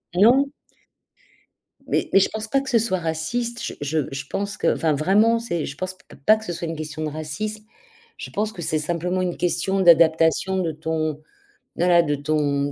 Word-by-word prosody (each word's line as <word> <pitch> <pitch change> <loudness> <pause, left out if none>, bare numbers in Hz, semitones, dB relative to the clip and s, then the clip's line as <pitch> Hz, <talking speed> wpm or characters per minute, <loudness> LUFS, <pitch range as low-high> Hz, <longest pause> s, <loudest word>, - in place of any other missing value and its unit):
Non. 255 +9 +4 1.3
Mais - - 0
mais 195 - +7
je 195 - +2
pense 220 0 -5
pas 275 +4 +1
que 270 - -7
ce 235 - +4
soit 210 -4 0
raciste. 205 +9 -3
Je - - -4
je 150 +2 0
je 135 0 -5
pense 200 0 -3
que - - +2
enfin 160 -2 +1
vraiment 210 +10 +3
c'est 175 -9 -3
je 140 - -7
pense 185 0 -4 0.3
pas 215 - +6
que 220 - -10
ce 175 - -3
soit 170 0 -4
une 165 - -4
question 155 0 -5
de 155 - -1
racisme. 155 +9 -5 0.5
Je - - -7
pense 215 +1 -1
que 180 - -8
c'est 155 -1 0
simplement 175 +4 -1
une 180 -1 -2
question 190 +2 0
d'adaptation 165 +1 +4
de 170 -3 0
ton 155 -1 -3 0.5
voilà 175 0 +4
de 145 -2 0
ton 145 -1 0
175 Hz, 195 wpm, -23 LUFS, 155-210 Hz, 1.3 s, mais